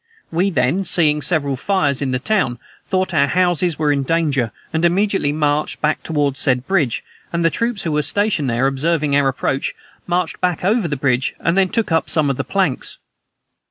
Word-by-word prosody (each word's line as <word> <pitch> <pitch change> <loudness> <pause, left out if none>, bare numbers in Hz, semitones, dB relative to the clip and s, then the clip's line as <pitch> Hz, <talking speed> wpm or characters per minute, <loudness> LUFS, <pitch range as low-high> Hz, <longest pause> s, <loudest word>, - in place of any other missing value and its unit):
We 180 +4 +1
then, 170 +2 +1
seeing 150 -5 +2
several 145 -4 +1
fires 145 -2 0
in 140 - -1
the 130 - 0
town 135 - 0 0.3
thought 185 -1 0
our 140 -3 +3
houses 175 -1 +1
were 150 -2 +1
in 140 -1 +1
danger, 140 -6 0 0.2
and 160 +1 0
immediately 190 -3 +2
marched 150 0 0
back 150 0 0
toward 145 -4 -1
said 125 -1 +1
bridge, 165 -12 0 0.3
and 170 0 0
the 165 - +4
troops 230 -4 -1
who 165 - -2
were 150 0 +1
stationed 200 -4 0
there, 120 +3 +1
observing 145 +2 +1
our 140 -1 +3
approach, 135 +1 -1 0.3
marched 175 -1 -1
back 180 -1 0
over 210 -1 +2
the 145 -3 -3
bridge, 130 -1 0
and 165 - 0
then 190 -1 +3
took 225 -3 -1
up 160 - +1
some 150 -3 +2
of 135 - -4
the - - -1
planks. - - -1
155 Hz, 195 wpm, -19 LUFS, 140-180 Hz, 0.3 s, the